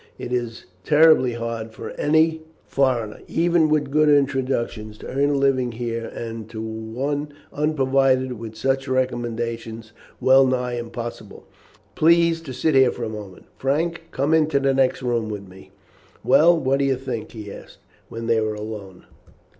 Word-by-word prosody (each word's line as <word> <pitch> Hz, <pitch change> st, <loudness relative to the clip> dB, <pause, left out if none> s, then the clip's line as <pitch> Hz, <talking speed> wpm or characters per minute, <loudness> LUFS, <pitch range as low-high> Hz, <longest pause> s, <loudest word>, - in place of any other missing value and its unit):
It 125 Hz, -, -6 dB
is 120 Hz, -2 st, -3 dB, 0.2 s
terribly 150 Hz, -4 st, +5 dB
hard 115 Hz, -1 st, -5 dB
for -, -, -7 dB
any 160 Hz, +1 st, +2 dB, 0.2 s
foreigner, 125 Hz, -6 st, 0 dB
even 170 Hz, -1 st, +2 dB
with 150 Hz, -2 st, +1 dB
good 155 Hz, +1 st, +4 dB
introductions, 130 Hz, -6 st, 0 dB
to -, -, -10 dB
earn 140 Hz, +2 st, +1 dB
a 145 Hz, -, +1 dB
living 130 Hz, -3 st, +1 dB
here, 115 Hz, -1 st, -4 dB
and 115 Hz, -1 st, -7 dB
to 110 Hz, -1 st, -7 dB
one 115 Hz, +7 st, -4 dB, 0.2 s
unprovided 135 Hz, -3 st, +1 dB
with 110 Hz, -1 st, -8 dB
such 135 Hz, +2 st, 0 dB
recommendations 115 Hz, -3 st, -3 dB, 0.3 s
well 130 Hz, +1 st, +5 dB
nigh 125 Hz, -1 st, -1 dB
impossible. 120 Hz, 0 st, -7 dB, 0.5 s
Please 170 Hz, 0 st, +3 dB
to 150 Hz, -5 st, -8 dB
sit 130 Hz, +5 st, 0 dB
here 130 Hz, -2 st, +5 dB
for 120 Hz, -, -6 dB
a 115 Hz, -, -2 dB
moment. 105 Hz, -4 st, -9 dB
Frank, 165 Hz, +5 st, -1 dB
come 140 Hz, +4 st, 0 dB
into 155 Hz, -3 st, +3 dB
the 135 Hz, 0 st, +2 dB
next 130 Hz, -1 st, +1 dB
room 120 Hz, -3 st, -1 dB
with 100 Hz, -2 st, -6 dB
me." 95 Hz, +1 st, -15 dB, 0.5 s
"Well, 170 Hz, +1 st, +5 dB
what 135 Hz, -1 st, +1 dB
do 140 Hz, -, +2 dB
you 135 Hz, -1 st, +2 dB
think?" 125 Hz, -4 st, -6 dB
he 105 Hz, -3 st, -8 dB
asked -, -, -13 dB, 0.3 s
when 115 Hz, 0 st, -6 dB
they 115 Hz, -1 st, +2 dB
were 110 Hz, 0 st, -1 dB
alone. 105 Hz, -3 st, -8 dB
130 Hz, 160 wpm, -22 LUFS, 115-140 Hz, 0.5 s, terribly